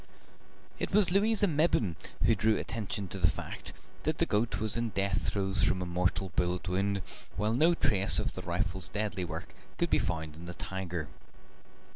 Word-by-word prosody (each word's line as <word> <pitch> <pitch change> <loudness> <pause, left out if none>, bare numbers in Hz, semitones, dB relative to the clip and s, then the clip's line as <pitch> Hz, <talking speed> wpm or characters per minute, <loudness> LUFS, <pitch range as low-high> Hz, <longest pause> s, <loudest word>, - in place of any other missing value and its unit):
It - - -1
was 200 -3 +4
Louisa 205 +2 +3
Mebbin 150 - +2 0.3
who - - +5
drew 110 +1 +2
attention 105 -3 -3
to 95 - -5
the 80 -4 +4
fact - - -6 0.3
that - - -1
the - - +2
goat 105 -1 0
was 110 -1 -1
in 115 0 -1
death 100 -1 0
throes 95 -2 +1
from 95 0 +2
a 90 - -2
mortal 90 +1 0
bullet 90 +1 0
wound, 100 +1 0 0.3
while 105 +1 0
no 160 +8 +4
trace 100 - +5
of - - 0
the - - -6
rifle's 90 +1 -1
deadly 105 -3 -2
work 80 -1 -6 0.2
could - - 0
be - - +4
found 80 -1 -3
on 85 +2 -10
the 90 0 -7
tiger. 90 -5 -4
95 Hz, 180 wpm, -31 LUFS, 90-110 Hz, 0.3 s, who